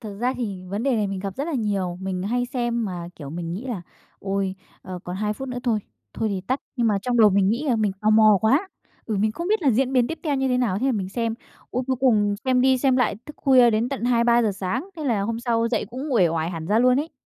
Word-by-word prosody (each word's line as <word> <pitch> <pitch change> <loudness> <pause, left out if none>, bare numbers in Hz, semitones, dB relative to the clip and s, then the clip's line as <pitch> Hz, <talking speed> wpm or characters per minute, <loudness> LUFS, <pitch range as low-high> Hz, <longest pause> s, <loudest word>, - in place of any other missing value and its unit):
Thực 215 -4 -7
ra 250 +2 +1
thì 195 -6 -4
vấn 205 +4 -3
đề 270 -2 +2
này 210 -2 +1
mình 195 -1 -4
gặp 195 -1 -5
rất 280 - -2
là 335 - -3
nhiều. 200 -7 -1
Mình 190 -1 -3
hay 245 +5 -1
xem 240 -2 -1
mà, 175 -3 -5
kiểu, 145 -3 -8
mình 170 0 -5
nghĩ 220 +9 -5
là 215 -8 -4 0.4
"Ôi, 195 -1 -2 0.3
ờ, 185 -1 -7
còn 180 +1 -5
2 210 +1 -1
phút 265 +4 -7
nữa 250 - -4
thôi 225 -4 +1 0.3
thôi 220 - -1
thì 195 -2 -2
tắt." 260 +9 -2 0.2
Nhưng 235 - +1
mà 205 -3 +2
trong 245 -1 0
đầu 215 -3 +7
mình 195 0 +3
nghĩ 235 +7 0
là 240 - +3
mình 210 -3 +1
tò 215 0 +2
mò 215 -2 +6
quá, 280 - +2 0.4
bởi 215 -3 -1
mình 215 +1 +1
không 340 - -4
biết 435 -4 +1
là 275 - +4
diễn 260 +3 +1
biến 245 -2 +3
tiếp 325 - -5
theo 300 -4 0
như 265 0 0
thế 250 - +1
nào, 210 -6 +1
thế 260 - 0
là 270 - +2
mình 195 -4 -2
xem. 230 +2 -2 0.4
Ôi, 250 - -1
cuối 260 -1 0
cùng 210 -6 +3
xem 255 -1 +3
đi 260 0 +4
xem 260 0 +2
lại 245 -5 +1
thức 300 - -10
khuya 255 -3 +5
đến 225 +3 +1
tận 270 -4 -4
2:00-3:00 235 -2 +3
sáng. 215 - -3
Thế 310 - -5
là 230 -7 +1
hôm 230 +3 -2
sau 230 -1 +1
dậy 225 -4 0
cũng 265 +3 -5
uể 185 -8 +4
oải 165 +1 -1
hẳn 165 -2 -6
ra 210 +3 +2
luôn 250 +2 +4
ấy. 315 +2 -6
230 Hz, 280 wpm, -23 LUFS, 200-255 Hz, 0.4 s, đầu